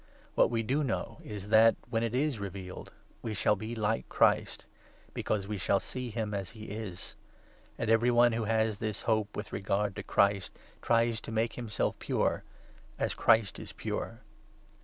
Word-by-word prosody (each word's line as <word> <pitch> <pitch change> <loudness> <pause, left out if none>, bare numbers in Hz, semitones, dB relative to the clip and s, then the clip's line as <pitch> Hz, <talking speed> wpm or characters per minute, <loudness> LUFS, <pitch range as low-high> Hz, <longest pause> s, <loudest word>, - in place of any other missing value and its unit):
What - - +4
we 115 -1 0
do 135 +7 +1
know 115 -3 -2
is 105 -1 -7
that, 110 +1 +7 0.2
when 115 -2 +1
it 115 +1 -1
is 140 -3 +1
revealed, 95 -2 -7 0.3
we 110 -2 -3
shall 105 +1 +3
be 110 +4 -5
like 110 0 -1
Christ; - - +2 0.5
because 100 -2 -1
we 105 -1 -3
shall 100 +2 +2
see 125 +3 -5
him 110 -2 -3
as 100 -2 -3
he 110 - -8
is. 105 -4 -6 0.6
And 120 - -2
every 115 +2 +4
one 120 0 +5
who 115 -1 -1
has 110 -1 +1
this 110 -2 -3
hope 110 -2 0
with 105 - -5
regard 100 0 0
to - - -2
Christ 100 -1 +2
3 - - -25 0.2
tries 115 -1 +2
to - - -7
make 115 +1 0
himself 115 -4 -2
pure - - 0 0.3
— - - -25
as - - 0
Christ 110 -3 +3
is - - -8
pure. - - -4
110 Hz, 180 wpm, -31 LUFS, 105-115 Hz, 0.6 s, that